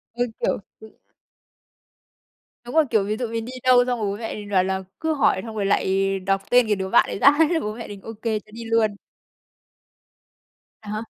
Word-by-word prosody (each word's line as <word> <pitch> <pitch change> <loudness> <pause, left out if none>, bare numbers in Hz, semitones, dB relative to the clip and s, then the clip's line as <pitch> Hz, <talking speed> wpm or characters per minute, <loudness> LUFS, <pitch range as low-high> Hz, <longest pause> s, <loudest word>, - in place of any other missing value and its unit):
Cứ, 245 +1 0
kiểu - - 0 0.2
cứ 220 0 -12 1.8
Đúng 245 - -8
rồi, 320 -1 +5
kiểu, 215 -4 +2
ví 210 +2 -2
dụ 245 - -2
mình 225 0 -3
đi 245 - -8
đâu 250 -1 +6
xong 245 -1 -1
rồi 215 - -1
bố 200 - -3
mẹ 225 +1 -5
mình 205 -1 -8
bảo 185 -2 +3
là 190 0 -2 0.2
cứ 320 0 0
hỏi 275 - +2
xong 225 -1 -7
rồi 200 -2 -1
lại 195 0 +1
đọc 195 +1 0
tên 245 -1 +5
cái 210 -1 +1
đứa 190 0 -3
bạn - - +5
ấy - - -4
ra 280 - +7 0.2
thế 330 -1 +1
bố 215 -5 -4
mẹ 230 0 -8
mình 205 -1 -9
ô 225 - -7
kê, 220 -2 0
cho 215 - -23
đi 230 0 -7
luôn. 225 -2 +1 1.9
À 210 - -8
hả? 215 +1 -3
220 Hz, 220 wpm, -23 LUFS, 200-240 Hz, 1.9 s, ra